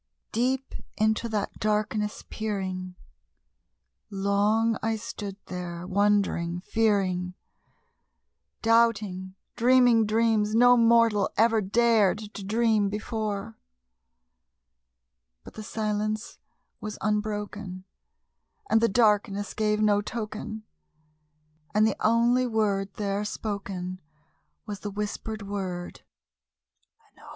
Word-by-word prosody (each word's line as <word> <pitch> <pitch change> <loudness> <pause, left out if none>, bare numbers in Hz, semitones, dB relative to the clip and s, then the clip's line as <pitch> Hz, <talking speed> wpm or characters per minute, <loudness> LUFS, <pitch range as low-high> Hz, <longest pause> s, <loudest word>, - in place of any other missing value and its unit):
Deep 260 +3 -1 0.2
into 220 +2 +1
that 210 -2 -3
darkness 210 0 -1
peering, 185 -4 -4 1.1
long 205 +3 +1
I 225 0 0
stood 205 -2 -6
there 175 -1 -6
wondering, 190 -3 +1
fearing, 185 -4 0 1.3
Doubting, 215 -5 +2 0.2
dreaming 245 -2 +5
dreams 220 -1 +2
no 245 +1 +7
mortal 230 -3 +4
ever 225 0 +4
dared 215 0 +3
to 210 -2 -8
dream 215 0 +2
before; 210 - -4 1.8
But - - -12
the 220 - -8
silence 215 0 -3 0.4
was 215 -1 -6
unbroken, 210 -3 -3 0.9
and 220 - +5
the 230 - +3
darkness 205 -2 +2
gave 215 0 +1
no 205 -1 +3
token, 215 0 -5 1.1
And 215 +1 +5
the 220 - +1
only 235 +3 +3
word 205 -4 0
there 200 0 -2
spoken 195 -4 -5 0.6
was 205 -2 -6
the 205 - -5
whispered 210 +1 -4
word, 190 -3 -5 1.1
"Lenore!" - - -15
210 Hz, 95 wpm, -27 LUFS, 200-225 Hz, 1.8 s, no